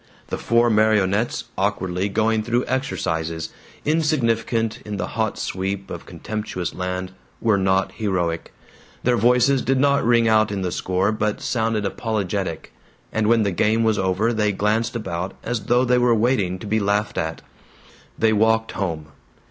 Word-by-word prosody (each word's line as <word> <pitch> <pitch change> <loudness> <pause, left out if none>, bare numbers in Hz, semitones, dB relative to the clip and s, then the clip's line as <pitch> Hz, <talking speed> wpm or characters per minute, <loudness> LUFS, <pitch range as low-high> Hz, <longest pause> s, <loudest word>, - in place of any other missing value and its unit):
The - - -2
four 115 +1 +3
marionettes, 105 0 +2 0.2
awkwardly 95 +2 -1
going 110 +2 +1
through 120 +3 0
exercises, 80 - -2 0.4
insignificant 115 -8 +1
in 105 -1 -5
the - - -3
hot 110 -2 -1
sweep 95 +1 -3
of - - -7
contemptuous 105 -5 -4
land, 90 0 -3 0.3
were 110 -4 +2
not 95 0 +1
heroic; 90 -6 -2 0.5
their 125 0 +3
voices 125 +3 +3
did 135 0 +1
not 140 0 +3
ring 115 0 +4
out 110 -1 +3
in 100 -2 -2
the 90 - -1
score, 95 +4 0
but 105 -1 -1
sounded 110 -3 -1
apologetic; 100 -4 -3 0.4
and 110 -1 +1
when 115 0 +4
the 100 - 0
game 110 +6 +2
was 110 -2 +2
over 95 +5 +1
they 105 -2 +1
glanced 110 +4 0
about 95 -4 -4
as 115 -3 -3
though 125 +3 +3
they 125 0 +3
were 120 -1 +4
waiting 105 -5 +1
to 90 - -10
be 110 +1 +1
laughed 105 +1 0
at. 80 0 -3 0.7
They 110 -1 +3
walked 110 +1 +2
home. 80 -6 -3
110 Hz, 155 wpm, -22 LUFS, 95-115 Hz, 0.7 s, ring